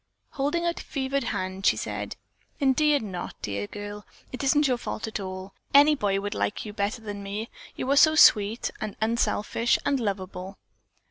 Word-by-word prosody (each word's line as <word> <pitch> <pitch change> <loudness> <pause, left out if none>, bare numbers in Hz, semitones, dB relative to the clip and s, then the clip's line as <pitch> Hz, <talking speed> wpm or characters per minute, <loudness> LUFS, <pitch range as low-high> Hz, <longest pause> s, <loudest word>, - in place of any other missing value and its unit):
Holding 295 +5 -1
out 340 0 -1
a - - -7
fevered 275 -1 -2
hand, 190 -3 -3
she - - +4
said: - - -4 0.4
"Indeed 285 0 +3
not, 180 -4 -6
dear 100 0 -3
girl. 205 - -7 0.3
It 255 - -5
isn't 290 +2 +4
your 250 -2 0
fault 220 - -4
at 220 - -4
all. 185 0 -6 0.2
Any 290 +2 +8
boy 205 -8 0
would 205 +1 -3
like 210 - -2
you 210 - -7
better 210 +3 -2
than 205 -1 -6
me. 205 +3 -5 0.2
You - - -4
are - - +4
so 310 +1 +7
sweet 215 -5 +5
and 215 -2 -4
unselfish 230 +1 +1
and 280 -1 +2
lovable." 190 -3 -4
220 Hz, 180 wpm, -26 LUFS, 200-275 Hz, 0.4 s, Any